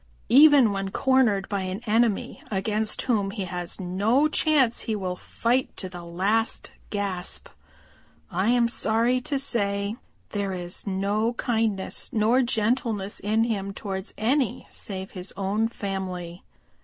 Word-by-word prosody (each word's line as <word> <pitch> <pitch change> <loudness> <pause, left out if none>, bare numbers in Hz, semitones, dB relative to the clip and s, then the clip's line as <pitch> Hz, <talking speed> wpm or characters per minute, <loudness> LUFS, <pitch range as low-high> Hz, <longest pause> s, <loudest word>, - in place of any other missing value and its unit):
Even 275 -3 +7
when 195 -1 -2
cornered 235 -5 +2
by 200 -2 -2
an 185 +1 -3
enemy 225 -1 +1
against 215 +2 0
whom 210 -6 +1
he 195 -1 -4
has 175 -1 -5
no 205 +10 +2
chance 295 -6 +3
he 220 - -2
will 185 -3 -3
fight 245 +7 -1
to 185 - -4
the 175 -1 -9
last 195 +7 -1 0.2
gasp. 195 -3 -3 0.8
I 190 +5 +1
am 240 -1 +4
sorry 235 +2 +1
to 280 +2 -1
say 200 -6 0 0.4
that - - -13
there 200 -1 -1
is 175 +2 -3
no 200 +4 0
kindness 225 -5 -1
nor 230 +2 +3
gentleness 225 -3 0
in 215 +2 +1
him 200 -4 -2
towards 195 -1 -5
any 250 +1 0
save 190 -1 -6
his 185 0 -6
own 200 +3 0
family. 190 -5 -5
210 Hz, 140 wpm, -25 LUFS, 195-235 Hz, 0.8 s, Even